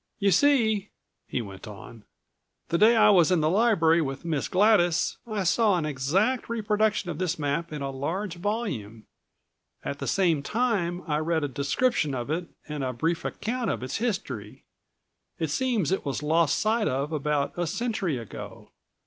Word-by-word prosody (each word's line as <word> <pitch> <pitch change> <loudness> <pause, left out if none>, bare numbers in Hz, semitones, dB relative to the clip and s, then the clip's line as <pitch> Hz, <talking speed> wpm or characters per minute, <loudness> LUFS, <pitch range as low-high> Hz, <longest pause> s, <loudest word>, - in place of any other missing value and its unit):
"You 200 -1 +2
see," 220 - +3 0.4
he 120 - -2
went 95 -1 -10
on, 105 +1 -11 0.6
"the 170 - +1
day 225 +3 +6
I 220 - +6
was 180 -2 +5
in 180 - +4
the 155 +1 +2
library 180 -6 +4
with 135 +2 -4
Miss 155 -4 -1
Gladys 185 -4 +3
I 215 -3 -2
saw 200 +2 +3
an 160 - -1
exact 165 - 0
reproduction 215 -4 0
of 155 - -7
this 185 -1 -1
map 155 +3 -2
in 150 -2 -4
a 135 - -3
large 170 +8 -3
volume. 170 - -3 0.8
At 140 - -4
the - - -4
same 175 -7 +2
time 190 - -1
I 150 -2 0
read 160 0 0
a - - +1
description 145 - 0
of 125 +3 -4
it 170 +2 -2 0.2
and 150 -2 -4
a 130 -1 -2
brief 165 +6 -1
account 235 +2 -3
of - - -2
its 130 - -3
history. 185 - -4 0.7
It 160 -3 -2
seems 230 - 0
it 190 - 0
was 140 0 -3
lost 160 0 +2
sight 220 0 +1
of 140 +4 -1
about 150 -2 -1
a 175 -1 -1
century 205 - -1
ago. 115 -3 -9
170 Hz, 175 wpm, -26 LUFS, 145-210 Hz, 0.8 s, day